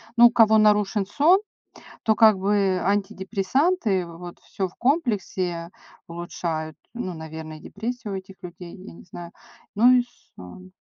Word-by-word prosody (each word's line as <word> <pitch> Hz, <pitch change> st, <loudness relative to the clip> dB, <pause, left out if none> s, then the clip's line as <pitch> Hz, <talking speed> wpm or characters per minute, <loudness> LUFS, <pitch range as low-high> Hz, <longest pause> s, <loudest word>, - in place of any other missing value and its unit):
Ну, 240 Hz, 0 st, +8 dB
у 235 Hz, -, 0 dB
кого 220 Hz, -2 st, +5 dB
нарушен 210 Hz, -1 st, +3 dB
сон, 315 Hz, -, +4 dB, 0.6 s
то 220 Hz, -1 st, +3 dB
как 215 Hz, -3 st, +6 dB
бы 195 Hz, -1 st, +1 dB
антидепрессанты, 200 Hz, -, 0 dB
вот 170 Hz, +1 st, -10 dB
всё 190 Hz, -1 st, -4 dB
в 180 Hz, -, -18 dB
комплексе 195 Hz, -, -1 dB, 0.4 s
улучшают, 170 Hz, -2 st, -5 dB, 0.2 s
ну, 210 Hz, -6 st, -5 dB
наверное, 160 Hz, 0 st, -8 dB
депрессию 220 Hz, +3 st, -6 dB
у 195 Hz, -, -2 dB
этих 190 Hz, 0 st, -11 dB
людей, 175 Hz, 0 st, -9 dB
я 190 Hz, -1 st, -12 dB
не -, -, -14 dB
знаю. 175 Hz, -1 st, -10 dB, 0.4 s
Ну 235 Hz, +5 st, +6 dB
и 250 Hz, -1 st, +4 dB, 0.3 s
сон. 180 Hz, -, -12 dB
195 Hz, 145 wpm, -24 LUFS, 175-220 Hz, 0.6 s, Ну